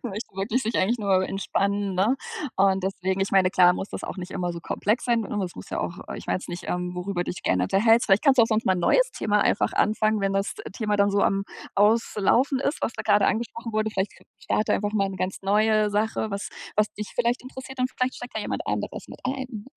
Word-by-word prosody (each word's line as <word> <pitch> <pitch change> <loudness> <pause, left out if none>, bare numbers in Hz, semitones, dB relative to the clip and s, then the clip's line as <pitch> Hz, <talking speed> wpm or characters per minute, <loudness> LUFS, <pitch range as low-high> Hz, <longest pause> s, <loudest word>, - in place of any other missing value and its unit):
Möchte 215 -3 -6
wirklich 205 +6 -1
sich 225 - -1
eigentlich 230 +6 +2
nur 195 -3 +2
entspannen, 200 0 -1
ne? 205 +8 +2 0.4
Und 195 0 +3
deswegen 190 0 -1
ich 195 - 0
meine, 190 -2 +4
klar, 180 -1 +6
muss 195 - -5
das - - -6
auch - - -5
nicht 180 0 -7
immer 180 -2 -2
so 170 - -6
komplex 215 +7 -1
sein 235 -2 +2
sondern 205 -1 -3
es 180 - -5
muss 90 - -10
ja - - -2
auch, - - -3 0.2
ich - - -9
weiß 95 +1 -2
nicht, 175 +1 -6
ähm, 180 0 -2
worüber 180 0 -2
dich 175 - -6
gerne 90 -1 +2
unterhältst. 225 - +4
Vielleicht 200 +7 +3
kannst 270 -2 +5
du 235 - +9
auch - - +4
sonst 220 0 0
mal 190 - +5
'n 180 - -2
neues - - +4
Thema 210 -1 +1
einfach 200 - +2
anfangen, 215 0 +2
wenn 195 0 0
das 195 0 -1 0.2
Thema 210 0 -1
dann 200 0 +3
so 200 - +2
am 195 0 +1 0.3
Auslaufen 225 +5 +3
ist, 280 +3 -1
was - - 0
da 215 - -5
gerade 205 -2 +4
angesprochen 230 0 -2
wurde. 215 0 0
Vielleicht 195 -1 -2 0.3
starte 215 - 0
einfach 205 +1 0
mal 195 -2 +1
'ne 190 - -6
ganz 185 +1 -2
neue 215 +1 +3
Sache, 220 +1 0
was, 200 0 -3 0.3
was 210 0 +2
dich 210 0 -6
vielleicht 240 +1 +1
interessiert, 260 +1 -9
und 255 0 +1
vielleicht 255 +1 0
steigt 245 - -9
ja 220 - -1
jemand - - -4
anderes - - -3
mit - - -12
ein, 255 -5 -4
205 Hz, 235 wpm, -25 LUFS, 195-225 Hz, 0.4 s, du